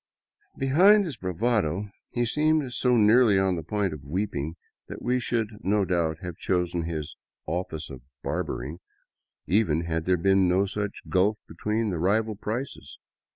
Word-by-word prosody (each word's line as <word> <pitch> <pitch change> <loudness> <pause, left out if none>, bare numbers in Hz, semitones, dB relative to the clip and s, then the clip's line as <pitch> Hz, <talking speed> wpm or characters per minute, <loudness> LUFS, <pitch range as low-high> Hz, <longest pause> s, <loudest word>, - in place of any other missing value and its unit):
Behind 185 +10 +5
his 155 -7 -5
bravado 100 0 -1 0.2
he 120 0 0
seemed 150 +1 +1
so 125 0 +2
nearly 110 -1 +5
on 95 -1 +2
the 85 - -3
point 100 0 -1
of 75 -3 -9
weeping 80 -1 -3 0.3
that - - -7
we 125 +1 0
should 115 -3 -1
no 100 0 +2
doubt 85 -4 0
have 90 -2 -6
chosen 90 -2 -1
his 80 -2 -4 0.3
office 80 -2 -3
of 65 -2 -9 0.2
barbering," 70 +8 -3 0.7
even 90 -6 +2
had 80 -1 -2
there 90 0 +3
been 95 +2 +3
no 95 +2 +3
such 100 +1 -4
gulf 100 +3 +2
between 110 0 -1
the 85 - -2
rival 110 +5 +1
prices. 115 +6 -5
95 Hz, 155 wpm, -26 LUFS, 85-115 Hz, 0.7 s, Behind